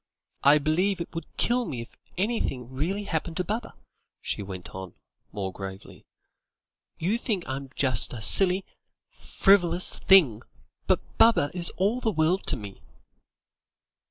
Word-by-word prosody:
"I 145 +2 +6
believe 175 +7 +1
it 170 - -6
would 165 -1 -5
kill 245 +1 +2
me 130 - -5
if 115 - -12 0.2
anything 155 - -2
really 180 +10 -2
happened 165 -3 -3
to 180 - +1
Baba," 220 +5 -4 0.4
she - - -4
went 95 -2 -8
on, 95 -1 -8 0.4
more 95 -2 -4
gravely; 95 0 -9 0.9
"you 195 +8 0
think 205 -8 -2
I'm 135 +1 -5
just 130 -6 +2
a 120 - -6
silly, 185 - +3 0.5
frivolous 180 -3 +2
thing, 150 - +5 0.5
but - - +3 0.2
Baba 225 -11 +5
is 175 -1 -1
all 210 +7 +1
the 225 - +1
world 165 +3 +1
to - - 0
me." 100 -2 -9
165 Hz, 140 wpm, -26 LUFS, 125-195 Hz, 0.9 s, I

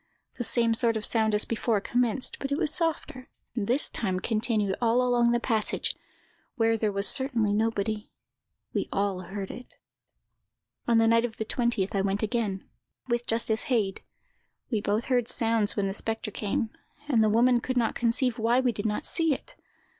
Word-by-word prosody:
The 245 - -2
same 230 -1 +2
sort 230 -1 +1
of 215 - -3
sound 220 -2 +1
as 210 - +3
before 230 -1 0
commenced, 245 +3 0
but 275 - -4
it 280 - +1
was 315 -3 -1
softer, 315 -6 -2 0.3
and 210 -4 -2
this 255 +5 +2
time 190 -5 -2
continued 215 -2 0
all 240 +1 +3
along 240 -1 +3
the 240 0 +2
passage, 225 -3 0 0.6
where 225 -2 +2
there 215 -1 0
was 200 0 +1
certainly 240 -6 +2
nobody. 215 0 -1 0.6
We - - -2
all 200 -2 0
heard 195 +1 -6
it. 250 - -11 1.1
"On 235 -1 +4
the 225 0 +4
night 230 0 +4
of 230 -2 -4
the 220 - -3
20th 235 -5 -1
I 195 - +1
went 195 +2 -1
again, 215 -4 -2 0.4
with 240 0 -1
Justice 225 -1 -1
Heyd. 210 -7 0 0.7
We 220 -3 0
both 210 +4 0
heard 245 -3 +1
sounds 225 -3 +1
when 205 - 0
the 195 - -2
spectre 225 +1 -2
came, 215 +2 -2 0.4
and 235 -7 +3
the 215 - +3
woman 240 +3 +4
could 255 +1 -2
not 230 -2 +2
conceive 235 0 0
why 235 +3 +3
we 255 -2 +2
did 220 -1 -3
not 215 +8 -2
see 325 -4 +3
it. - - -12
225 Hz, 185 wpm, -27 LUFS, 210-245 Hz, 1.1 s, On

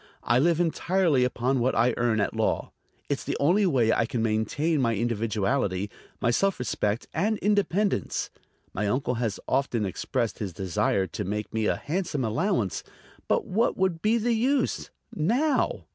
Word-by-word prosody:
I 120 - +3
live 165 +3 +3
entirely 170 -4 +2
upon 125 +1 0
what 125 +2 +1
I 120 +1 +3
earn 120 -2 +1
at - - -1
law. - - 0 0.4
It's - - -2
the - - -2
only 185 +8 +3
way 120 -8 +3
I 115 - +1
can 115 -1 -2
maintain 115 +8 0
my 115 -2 +2
individuality, 105 -2 -1 0.3
my 120 - +2
self 195 +10 +1
respect 105 -2 -1
and 210 +7 +1
independence. 205 - 0 0.4
My 105 +2 -1
uncle 125 +3 0
has 110 -4 -1
often 130 -5 0
expressed 115 +5 -2
his 100 -5 -4
desire 95 +1 0
to 85 - -5
make 105 +3 -4
me 110 -1 0
a - - +2
handsome 155 -5 -2
allowance, 115 - 0 0.4
but - - +1
what 225 +5 +1
would 185 -3 0
be 220 +2 +3
the 235 +1 +1
use... 260 +5 0 0.2
now?" 255 - +1
125 Hz, 160 wpm, -26 LUFS, 110-185 Hz, 0.4 s, I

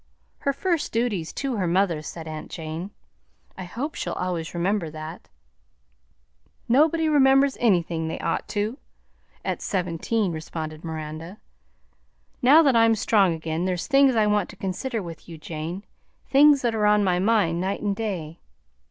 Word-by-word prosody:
"Her 280 - 0
first 335 +3 -1
duty 225 -6 0
's 160 - -8
to 265 -4 -2
her 185 -3 0
mother," 175 -2 +1
said 160 +1 -8
aunt 155 -1 -7
Jane; 160 +3 -6 0.7
"I 185 - -7
hope 255 - -4
she'll - - -4
always 175 -2 -3
remember 175 0 0
that." 155 +2 -9 1.4
"Nobody 315 +6 +3
remembers 270 -2 +4
anything 170 -7 +1
they'd 160 - -4
ought - - -1
to, 215 +6 -2 0.7
at - - -2
seventeen," 185 +2 -1
responded 155 -1 -6
Miranda. 160 +3 -6 1.0
"Now 285 +6 +7
that 275 -5 +3
I'm 225 0 +5
strong 195 -5 +3
again, 160 +2 -3
there's 180 -2 -1
things 275 -2 +4
I 220 -1 +3
want 210 -2 +1
to - - -11
consider 200 +4 -3
with 170 -1 -10
you, 165 - -8
Jane, 165 +5 -6 0.5
things 280 0 +6
that 235 -2 +1
are 210 -1 +2
on 210 0 +4
my 180 -2 +2
mind 190 -5 +2
night 190 +2 -2
and 205 -1 0
day. 175 -7 -4
195 Hz, 155 wpm, -24 LUFS, 165-230 Hz, 1.4 s, Now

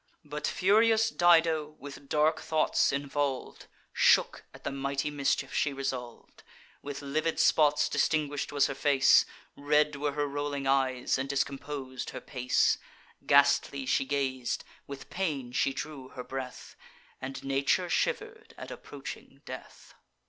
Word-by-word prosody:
But 150 0 -4
furious 225 +3 +3
Dido, 165 -4 +3
with 140 0 -11
dark 155 +1 +2
thoughts 155 -1 +2
involv'd, 140 -1 -3 0.3
Shook - - +3
at - - -15
the - - -2
mighty 140 +1 -2
mischief 140 -2 -1
she 145 - +1
resolv'd. 130 -3 -6 0.4
With 145 0 -7
livid 155 +4 -1
spots 150 -2 +4
distinguish'd 145 -2 0
was 145 -1 +3
her - - -2
face; 140 -1 +4 0.3
Red 150 +1 +2
were 145 0 -2
her 145 0 0
rolling 145 -1 -3
eyes, 130 -1 +1
and 135 +1 -3
discompos'd 140 -1 -3
her - - -6
pace; 125 -2 +1 0.5
Ghastly 140 -1 +4
she 130 - +2
gaz'd, 130 -3 -2 0.2
with 140 -1 -9
pain 150 -10 -2
she 135 - +1
drew 135 -1 -6
her 125 - -8
breath, 130 0 -7 0.5
And 135 +1 -6
nature 140 +6 +1
shiver'd 435 - -2
at - - -8
approaching - - -9
death. - - -10
140 Hz, 135 wpm, -29 LUFS, 135-150 Hz, 0.5 s, spots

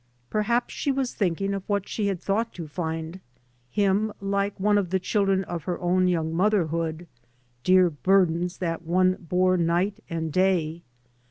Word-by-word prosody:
Perhaps 235 +3 0
she 280 - -1
was 265 -2 -1
thinking 195 0 -1
of 195 - -2
what 200 -1 0
she 210 -2 -2
had 195 -3 -1
thought 215 +5 -1
to 170 -3 -6
find 160 +2 -4 0.5
him, 205 - +1
like 200 0 -1
one 205 +1 +3
of 185 -4 -2
the 190 - +2
children 195 0 +1
of 170 -3 -6
her 180 - -2
own 180 +1 +2
young 165 -3 0
motherhood, 170 -3 0 0.6
dear 185 0 +5
burdens 180 +1 +2
that 165 -2 -2
one 185 +2 +2 0.2
bore 185 +1 +3
ntg^t 175 +5 +1
and 160 -2 -3
day. 175 -3 +1
185 Hz, 160 wpm, -25 LUFS, 170-200 Hz, 0.6 s, dear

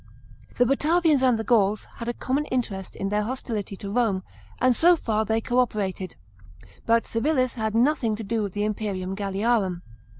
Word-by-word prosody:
The 245 - +4
Batavians 305 +2 +3
and 255 -3 +4
the 220 - -3
Gauls 215 -2 +2
had 230 - -6
a 240 - -1
common 275 +3 -1
interest 210 -8 -3
in 195 - -3
their 210 +1 +1
hostility 220 -3 -4
to 200 +1 -7
Rome, 210 -5 +1 0.4
and 255 0 +3
so 345 +6 +5
far 220 -8 -1
they 220 +1 0
co 245 +2 0
operated; 195 -6 -1 0.7
but 230 0 +3
Civilis 255 +1 0
had 220 -2 -2
nothing 240 -2 +2
to 220 - -6
do 220 +2 -1
with 200 -3 -3
the 205 - -1
imperium 200 -3 -2
Q 205 - -5
alliarum. 195 -3 0
225 Hz, 180 wpm, -25 LUFS, 205-250 Hz, 0.7 s, so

